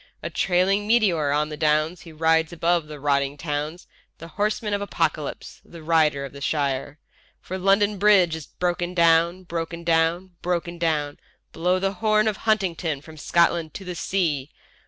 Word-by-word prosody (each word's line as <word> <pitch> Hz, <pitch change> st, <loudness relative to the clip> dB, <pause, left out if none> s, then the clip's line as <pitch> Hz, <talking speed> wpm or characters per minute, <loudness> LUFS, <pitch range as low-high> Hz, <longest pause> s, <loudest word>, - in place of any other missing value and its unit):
A -, -, -4 dB
trailing 195 Hz, +3 st, +1 dB
meteor 195 Hz, -10 st, +3 dB
on 150 Hz, +1 st, +1 dB
the 150 Hz, -, -5 dB
Downs 155 Hz, +2 st, +1 dB
he 165 Hz, -, -12 dB
rides 160 Hz, +1 st, +2 dB
above 170 Hz, -1 st, 0 dB
the 150 Hz, -1 st, -9 dB
rotting 140 Hz, 0 st, 0 dB
towns, 150 Hz, +2 st, -4 dB, 0.3 s
The 165 Hz, -, -10 dB
Horseman 210 Hz, +3 st, -1 dB
of 200 Hz, -, -1 dB
Apocalypse, 160 Hz, -6 st, -3 dB
the 170 Hz, -2 st, -13 dB
Rider 155 Hz, -4 st, +2 dB
of 135 Hz, -, -10 dB
the 140 Hz, -, -10 dB
Shires. 140 Hz, -1 st, -1 dB, 0.4 s
For 185 Hz, +1 st, -6 dB
London 200 Hz, +2 st, +2 dB
Bridge 190 Hz, -5 st, +5 dB
is 160 Hz, -4 st, -8 dB
broken 175 Hz, 0 st, -2 dB
down, 170 Hz, +2 st, +3 dB
broken 170 Hz, -1 st, -5 dB
down, 165 Hz, +2 st, +1 dB
broken 175 Hz, -1 st, -2 dB
down; 150 Hz, -3 st, -1 dB, 0.3 s
Blow 180 Hz, +3 st, +1 dB
the 195 Hz, +1 st, -1 dB
horn 215 Hz, +1 st, +2 dB
of 210 Hz, -3 st, 0 dB
Huntingdon 180 Hz, -9 st, -1 dB
from 160 Hz, +1 st, -13 dB
Scotland 170 Hz, +1 st, +1 dB
to 195 Hz, -, -7 dB
the 180 Hz, -, -4 dB
sea—... 155 Hz, -5 st, -1 dB
170 Hz, 165 wpm, -24 LUFS, 155-185 Hz, 0.4 s, Bridge